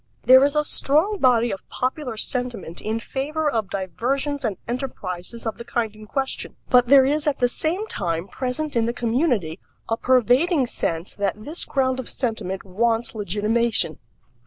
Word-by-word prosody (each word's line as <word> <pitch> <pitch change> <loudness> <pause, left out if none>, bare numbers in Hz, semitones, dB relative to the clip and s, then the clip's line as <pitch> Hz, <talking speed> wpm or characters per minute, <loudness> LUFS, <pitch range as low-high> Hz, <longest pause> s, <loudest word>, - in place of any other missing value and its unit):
There 260 +1 +8
is 285 +1 +2
a 300 - +3
strong 320 +9 +2
body 240 -4 +3
of 195 - -7
popular 255 -2 -3
sentiment 235 -8 -2
in 220 +1 -2
favor 300 +6 -2
of 225 -8 0
diversions 265 - -2
and 210 -6 -1
enterprises 230 -4 -5
of 225 +1 -3
the - - -6
kind 235 -5 -2
in 215 0 -12
question; 270 +4 -3 0.2
but 245 -1 +6
there 270 0 +7
is 295 +2 0
at 290 - +1
the 245 - +3
same 335 - -1
time 170 - -2
present 260 +8 -3
in 230 -1 +2
the 235 - -1
community 235 - 0 0.3
a 225 - +1
pervading 260 - +3
sense 165 -6 -3
that 200 -1 -1
this 315 +4 -1
ground 260 -2 0
of 260 - -6
sentiment 220 -6 -3
wants 225 +4 0
legitimation. 210 -2 +1
240 Hz, 165 wpm, -23 LUFS, 215-275 Hz, 0.3 s, There